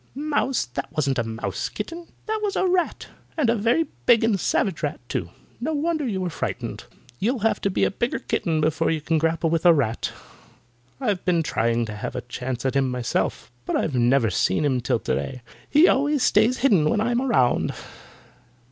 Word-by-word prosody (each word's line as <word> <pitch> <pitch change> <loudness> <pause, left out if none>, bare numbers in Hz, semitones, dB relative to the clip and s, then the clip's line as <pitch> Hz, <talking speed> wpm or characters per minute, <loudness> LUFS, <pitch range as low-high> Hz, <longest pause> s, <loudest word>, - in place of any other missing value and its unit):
"Mouse! 285 - 0
That 120 - -6
wasn't 135 -4 +1
a - - +1
mouse, 115 0 -4
kitten! 340 0 -6 0.2
That 440 0 -1
was 410 -2 -1
a - - +2
rat, 360 -2 0 0.3
and 265 -7 +3
a - - +2
very 235 +9 +2 0.2
big 230 -2 +6
and 220 -4 +2
savage 185 -2 0
rat, 150 -1 -2
too. 85 - -3 0.3
No 310 +7 -2
wonder 310 -1 0
you 195 -5 -2
were 180 -2 -2
frightened. - - -4 0.3
You'll 235 +3 0
have 225 - +1
to 200 - +1
be 185 - 0
a - - +2
bigger 235 +5 -1
kitten 160 -2 -1
before 155 +1 +1
you 160 - 0
can 160 +1 0
grapple 165 0 +1
with 165 -1 +1
a 175 -2 +7
rat. 120 -6 -1 0.9
I've 210 -9 -1
been 170 -2 +2
trying 115 -4 0
to 105 - -6
have 105 - -5
a - - -2
chance 125 0 -5
at 130 - 0
him 135 -1 +2
myself, 125 -1 -2 0.2
but - - 0
I've 150 - 0
never 125 +1 +3
even 90 - -4
seen 95 +11 +2
him 130 -3 +1
till 120 - +1
today. 125 +2 -3 0.3
He 310 +5 +6
always 285 0 +2
stays 220 +5 +4
hidden 195 - +3
when - - +1
I'm 240 +3 +1
around." 130 - +2
175 Hz, 200 wpm, -24 LUFS, -, 0.9 s, a